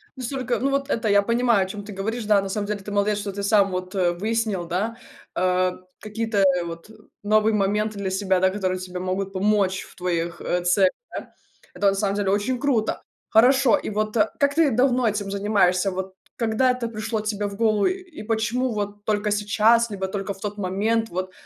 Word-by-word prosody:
настолько 255 -1 -2
Ну, 275 +1 0
вот 275 +1 -1
это 225 -1 0
я 200 0 +5
понимаю, 235 -2 +2
о - - -10
чём 205 0 -6
ты 205 -1 -9
говоришь. 220 +3 -3
Да, 205 -2 +4
на 195 - -5
самом 205 +1 -2
деле, 210 -1 -2
ты 205 +1 -8
молодец, 205 +1 +1
что 200 -1 -4
ты 200 +1 -5
сам 200 -2 +3
вот, 185 +1 -4
э, 180 -2 +2
выяснил, 215 -1 -1
да, 205 +7 -2 0.4
э, 185 0 +2 0.3
какие-то, 220 0 -3
э, 180 -2 +3
вот 170 +4 -8 0.3
новые 215 +1 +3
моменты 210 +1 0
для 190 -1 -2
себя, 190 -1 +1
да, 190 0 +4
которые 185 -2 -2
тебе 180 -1 -6
могут 190 +1 -2
помочь 195 -1 +1
в - - -16
твоих, 170 -2 -2
э, 180 0 -1
целях, 185 +1 +4 0.2
да? - - -7 0.4
Это, 200 - +1
на 195 - 0
самом 200 0 0
деле, 200 -2 0
очень 215 +5 0
круто. 255 -6 0 0.3
Хорошо. 250 +2 +5
И - - -5
вот, 215 +1 -2
э, 210 +1 +3
как 285 0 +2
ты 320 -5 +4
давно 250 -2 +3
этим 205 -1 -1
занимаешься? 195 -2 +2
Вот 190 +1 -5 0.2
когда 235 +2 +2
это 250 -2 -3
пришло 220 0 -3
тебе 210 -1 -2
в 200 - -7
голову? 215 -2 +2
И 365 - -4
почему 230 +3 0
вот 205 0 -4
только 210 -1 0
сейчас, 215 +3 +3
либо 190 -1 -3
только 195 0 -4
в 195 - -17
тот 205 0 -4
момент? 215 +4 0
Вот. 185 +1 -4
205 Hz, 205 wpm, -23 LUFS, 190-225 Hz, 0.4 s, я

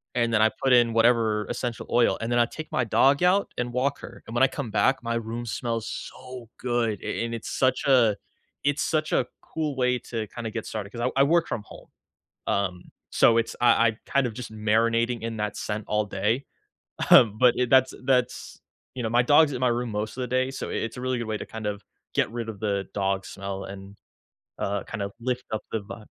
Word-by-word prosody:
and 120 -1 +1
then 110 - +4
I 110 - +6
put 135 -1 +4
in 120 -1 +5
whatever 115 -2 +3
essential 120 -1 -3
oil, 120 0 +3
and 115 - -2
then 120 - +3
I 120 - +5
take 155 +6 -8
my - - +1
dog 135 +7 +3
out 190 +3 +3
and 120 0 -2
walk 135 +3 0
her, - - -11
and 115 - -7
when 120 - +4
I - - +7
come 135 -2 -5
back, 130 +5 +2
my 115 0 -1
room 115 +1 -4
smells 115 -1 -3
so 125 -3 -8
good, 120 -4 -1
a - - -2
and 115 - -5
it's 115 - -6
such 130 0 +1
a 120 -6 +5 0.5
it's 145 0 +1
such 155 -1 0
a - - +3 0.2
cool 155 -3 -3
way 125 -1 +2
to 115 -2 -5
kinda 115 +1 -6
get 115 0 -5
started 105 -2 -5
'cause 120 - -6
I 135 - +4
I - - +8
work 165 +3 +3
from 105 - -3
home, - - -14 0.6
um, 90 -3 -1 0.3
so 115 -1 +5
it's 115 - -1
I 115 -1 +5
I 110 0 -4
kind 140 -2 +2
of 115 - -5
just 125 -2 -7
marinating 115 +2 +1
in 115 -1 -4
that 105 -1 -2
scent 105 0 -4
all 105 0 +1
day. 105 +7 -1 0.7
Um, 110 -3 +7
but 125 0 +6
it 125 -1 0
that's 130 -1 +5
that's 125 -2 0 0.3
you 130 - -4
know, 110 - -1
my 120 +1 +4
dog's 145 +3 +5
in 125 - -4
my 130 - +3
room 120 0 -1
most 105 +2 -3
of 130 - -3
the - - -1
day, 130 +1 +1
so 135 - -5
i - - -4
it's 115 - -3
a - - -6
really 130 -1 -1
good 115 - -4
way 110 - -1
to - - -6
kind 110 -1 -7
of, 105 0 -3 0.3
get - - +1
rid 115 -1 -4
of 105 -3 -7
the 100 -3 -1
dog 95 -1 -1
smell 100 0 -6
and, 100 +1 -10 0.6
uh, 100 0 -1
kind 110 - -6
of, 100 0 -3
lift 125 +1 -2
up 110 -1 -2
the 110 - -1
vibe. 105 +2 -10
115 Hz, 235 wpm, -26 LUFS, 110-125 Hz, 0.7 s, I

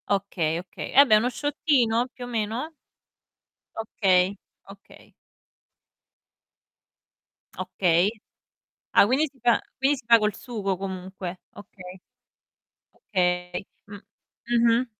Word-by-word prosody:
Okay, 190 -5 0
okay. 180 - -8
Eh - - +6
vabbè, 245 -7 +7
1 235 +4 +1
shottino 255 -5 +1
più 250 -1 -10
o - - -9
meno? 235 +6 -3 1.1
Okay. 195 -3 +1 0.3
Okay. 195 0 -16 2.5
Okay. 175 +1 +1 0.8
Ah, - - +6
quindi 270 +7 +1
si 270 - -28
fa 240 0 +3 0.2
quindi 275 +2 +2
si 250 - -13
fa 230 0 +7
col 210 -2 0
sugo, 200 -6 -3
comunque. 185 -1 -6 0.2
Okay. 185 -3 -12 1.0
Okay. 180 -2 -2 0.2
Mh, 205 0 -9 0.5
mh-mh. 235 +1 +3
210 Hz, 105 wpm, -25 LUFS, 190-245 Hz, 2.5 s, vabbè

